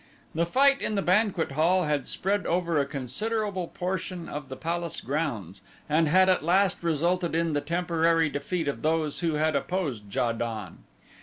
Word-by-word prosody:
The 170 +1 0
fight 275 +7 +4
in 215 - -1
the 195 - 0
banquet 185 -4 +2
hall 170 +6 +2
had 150 -3 -1
spread 200 +1 0
over 170 -2 +1
a 140 - 0
considerable 185 - -2
portion 180 -1 -4
of 145 -2 -6
the 130 - -5
palace 170 +1 -3
grounds 115 - -3 0.3
and 155 +2 +2
had 185 +5 +5
at 185 -4 +3
last 185 +3 +2
resulted 170 +1 0
in 165 -1 +1
the 145 - 0
temporary 165 0 +1
defeat 150 +3 -3
of 140 - -2
those 155 -1 0
who 165 -3 0
had 155 0 +1
opposed 140 - -2
Ja 120 - +2
don. 110 -5 -5
165 Hz, 170 wpm, -27 LUFS, 145-180 Hz, 0.3 s, had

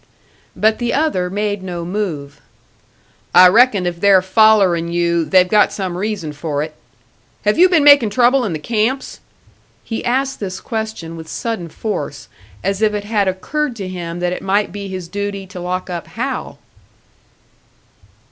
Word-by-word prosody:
But 220 0 +2
the 240 -1 -1
other 275 -12 0
made 205 +1 -2
no 175 -2 -5
move. 160 -8 -4 0.9
"I 180 +1 +9
reckon 215 -1 +4
if 175 0 -3
they're 195 -2 +5
follerin' 190 -4 +3
you, 170 -1 +1
they've 180 +4 +4
got 210 +2 +3
some 185 -3 -4
reason 190 -5 -3
for 145 0 -3
it. 155 0 -7 0.7
Have 210 +8 +2
you 365 +1 +7
been 335 -5 +3
makin' 285 -6 +7
trouble 250 +4 +3
in 215 - -2
the - - -2
camps?" 230 - -2 0.6
He 225 - -5
asked 270 +2 -1
this 190 -2 -5
question 220 -7 -5
with 160 -1 -9
sudden 220 -2 -4
force, 215 +6 -5 0.3
as 195 +1 -1
if 215 -1 +2
it 205 - -3
had 205 -2 0
occurred 255 +9 -2
to 195 -4 -6
him 175 -2 -6
that 180 0 0
it - - -6
might 200 +1 0
be 200 +1 -6
his 185 -2 -6
duty 200 +1 -4
to 185 -1 -10
lock 180 +1 -3
up 175 -2 -5
Hal. - - -4
195 Hz, 165 wpm, -18 LUFS, 175-220 Hz, 0.9 s, I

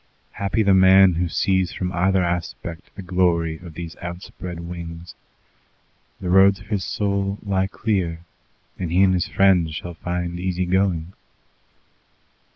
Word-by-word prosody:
Happy 100 +3 -1
the 100 -1 +4
man 95 0 +6
who 85 +1 -1
sees 95 +1 +1
from 90 -1 -3
either 95 +1 +2
aspect 85 -1 -4
the 100 - -8
glory 85 -3 +1
of 85 -3 -11
these 85 -1 -7
outspread 85 0 -7
wings. 85 0 -8 1.1
The 90 -2 -3
roads 95 +1 +5
of - - -14
his 100 -4 -1
soul 100 0 -1
lie 95 -2 0
clear, 95 -5 -2 0.6
and 85 -3 -3
he 90 +3 +4
and 95 -1 +4
his 90 -2 0
friends 90 -5 +3
shall 85 +1 -6
find 90 +1 -4
easy 90 0 -1
going. 90 -2 0
90 Hz, 145 wpm, -22 LUFS, 85-95 Hz, 1.1 s, man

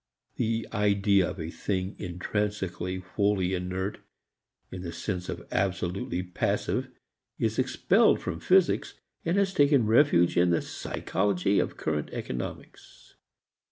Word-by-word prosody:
The 115 -1 -1
idea 100 -2 +3
of - - -7
a 80 0 -4
thing 95 +1 -2
intrinsically 95 0 -2
wholly 95 0 0
inert 95 +2 -3 0.7
in 90 - -6
the 85 -2 -5
sense 90 +2 -4
of - - -6
absolutely 90 -1 -1
passive 90 -1 -1 0.5
is - - 0
expelled - - +3
from 80 - -4
physics 185 - +3 0.3
and 170 +3 0
has 195 -1 +2
taken 140 - +4
refuge 110 - +4
in 90 0 +5
the 85 - +2
psychology 95 +1 0
of - - -2
current 75 -1 -2
economics. 60 0 -7
95 Hz, 120 wpm, -28 LUFS, 90-105 Hz, 0.7 s, in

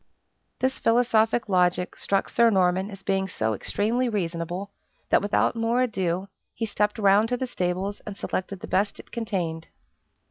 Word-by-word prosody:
This 260 0 0
philosophic 230 -1 +3
logic 180 -1 +2
struck 195 -1 0
Sir 235 -1 +4
Norman 190 -1 +2
as 195 -2 -10
being 195 -1 0
so 110 -11 -1
extremely 230 - 0
reasonable, 175 -1 -3 0.4
that - - +5
without 205 +3 +1
more 230 +2 +1
ado 190 -5 -1 0.3
he 225 - -2
stepped 210 0 0
round 205 +1 +4
to 250 - 0
the 260 - -2
stables 190 -2 -2
and 205 -2 -7
selected 190 0 -4
the 225 - -6
best 200 +2 0
it - - -13
contained. 180 -8 -3
200 Hz, 155 wpm, -25 LUFS, 185-225 Hz, 0.4 s, that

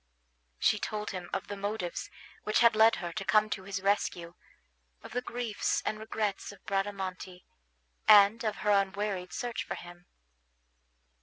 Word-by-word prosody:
She 210 - +2
told 210 0 -3
him 180 -2 -6
of - - -3
the 205 - -5
motives 200 -3 -4 0.3
which 215 +2 +2
had 235 -2 +6
led 220 +1 +6
her 175 -2 -5
to 195 - -3
come 210 +4 +3
to 190 -2 -3
his 195 -1 -4
rescue, 180 -4 0 0.7
of - - -10
the 250 - -1
griefs 240 -4 -2
and 215 - -2
regrets 215 -2 -3
of 200 - -17
Bradamante, 190 -2 -3 0.6
and 210 +2 +7
of 215 -2 -1
her 210 - +4
unwearied 195 -2 0
search 240 +6 -3
for - - -5
him. 175 0 -12
200 Hz, 155 wpm, -30 LUFS, 185-215 Hz, 0.7 s, and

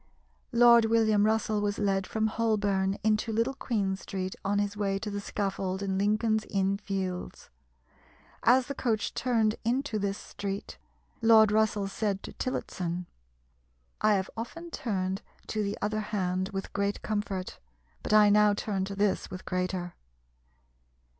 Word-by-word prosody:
Lord 235 -1 +7
William 220 -2 +3
Russell 220 -1 +1
was 205 0 -1
led 195 -2 0
from 220 0 -1
Holborn 205 -3 +1
into 215 +1 +1
Little 230 +5 +1
Queen 205 -8 -1
Street 190 -1 -5
on 200 +1 0
his 205 0 0
way 200 -1 0
to 210 +1 -4
the 205 0 -3
scaffold 195 -1 -2
in 190 -1 -1
Lincoln's 215 +2 +2
Inn 195 0 0
Fields. 190 -3 -4 0.9
As 250 +2 +5
the 280 - -4
coach 225 -5 -1
turned 225 -3 +1
into 240 -1 0
this 200 0 -1
street, 200 0 -6 0.4
Lord 220 -2 +6
Russell 215 -2 +2
said 200 -1 -2
to - - -8
Tillotson, 180 -8 -3 1.0
"I 215 -1 +4
have 190 0 -2
often 330 +10 -7
turned 190 -6 -2 0.2
to 215 - -2
the 205 0 -2
other 215 +1 0
hand 190 -3 -1
with 195 -1 -5
great 200 0 -1
comfort, 205 -3 -3 0.4
but - - -4
I 210 -1 +7
now 210 0 +5
turn 200 -2 -2
to 195 0 -6
this 200 0 0
with 185 - -8
greater." 180 -1 -2
205 Hz, 145 wpm, -29 LUFS, 195-220 Hz, 1.0 s, Lord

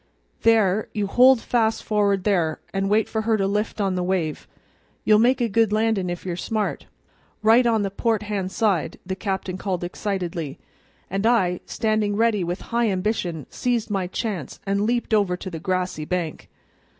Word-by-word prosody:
"There, 215 -3 +3
you 210 -2 -1
hold 250 +4 +5
fast 225 -2 +1
for'ard 200 -3 +1
there, 175 -7 +1
an' 195 0 0
wait 215 +1 +3
for 220 - -2
her 220 0 +1
to 195 - 0
lift 210 +3 -1
on 195 -2 +1
the 180 - -1
wave. 180 -4 -2 0.6
You'll 215 -1 +5
make 250 +3 +4
a 240 - +2
good 225 0 +2
landin' 215 -4 +1
if 175 +1 -5
you're 180 -2 -2
smart; 215 +4 -2 0.6
right 230 +3 +5
on 225 -3 +2
the 195 - -2
port 220 +1 0
hand 200 -3 -3
side!" 200 -7 0
the 190 - -3
captain 190 -2 -3
called 185 -3 -2
excitedly; 175 -5 -3 0.5
and 195 +4 0
I, 185 -7 +2
standing 215 -2 0
ready 220 -3 +2
with 175 +2 -3
high 235 -1 +2
ambition, 185 - -2
seized 240 -3 -1
my 190 -3 0
chance 185 - -4
and 200 +1 0
leaped 240 -1 0
over 200 -4 +2
to 185 - -7
the 165 - -5
grassy 185 -3 -2
bank. 175 -2 -3
200 Hz, 175 wpm, -23 LUFS, 185-220 Hz, 0.6 s, hold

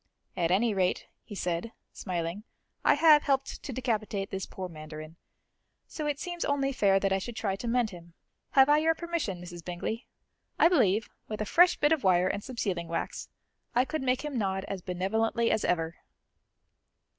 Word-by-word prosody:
"At 170 -2 +1
any 210 +5 +3
rate," 185 -2 0 0.2
he 205 - -9
said, 180 +4 -2 0.2
smiling, 175 +1 -4 0.4
"I - - +5
have 305 0 +7
helped 275 -2 -1
to 275 - -6
decapitate 215 -5 -2
this 190 -1 -4
poor 185 -1 -6
mandarin, 155 -1 -9 0.7
so 305 -2 -5
it 290 -1 -1
seems 350 -1 -4
only 275 -1 +1
fair 200 -7 +3
that 195 0 +1
I 195 - +2
should 235 +4 -6
try 195 -4 -1
to 235 - -6
mend 235 -2 +1
him. 170 -2 -13 0.4
Have 270 -1 +7
I 295 +1 +5
your 325 +1 +2
permission, 335 - -3
Mrs. 175 -1 -9
Bingley? 180 +7 -4 0.5
I 330 - +6
believe, 220 - +2 0.2
with 215 - -5
a 215 - -1
fresh 355 - +5
bit 295 +1 +2
of 320 -3 +2
wire 185 -1 +4
and 200 +2 -2
some 255 -2 -8
sealing 180 -6 -1
wax, 165 0 -4 0.5
I 250 +2 +4
could 315 +2 -3
make 255 +2 0
him 280 -5 -2
nod 190 -1 -1
as 195 -2 -4
benevolently 220 +6 0
as 220 - +1
ever." 165 -2 0
210 Hz, 185 wpm, -29 LUFS, 180-270 Hz, 0.7 s, have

